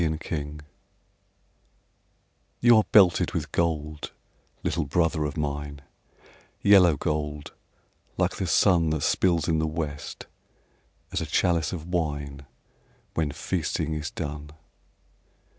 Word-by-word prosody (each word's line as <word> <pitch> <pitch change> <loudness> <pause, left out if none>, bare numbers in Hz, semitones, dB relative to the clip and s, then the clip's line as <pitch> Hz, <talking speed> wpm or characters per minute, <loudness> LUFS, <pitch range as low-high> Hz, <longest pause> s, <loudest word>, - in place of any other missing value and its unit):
THE - - +2
HOMING 75 -1 -4
BEE 75 - -13 2.0
You 120 -1 +6
are 110 - +4
belted 95 -5 +5
with - - -3
gold, 75 -2 -1 0.5
little 80 -1 0
brother 80 0 +1
of 75 +1 -4
mine, 75 -1 -4 0.8
Yellow 90 -6 +6
gold, 75 0 -3 0.6
like - - 0
the 95 - -2
sun 85 -2 +4
That 80 -2 -1
spills 85 -4 +2
in 80 -2 +2
the 80 - 0
west, 75 -2 -5 0.9
as - - -1
a - - -3
chalice 85 -3 +1
of 80 -4 -5
wine 75 -5 -3 0.7
When 80 -2 0
feasting 80 +2 -2
is 75 -1 -3
done. 75 -1 -6
80 Hz, 120 wpm, -26 LUFS, 75-85 Hz, 2.0 s, You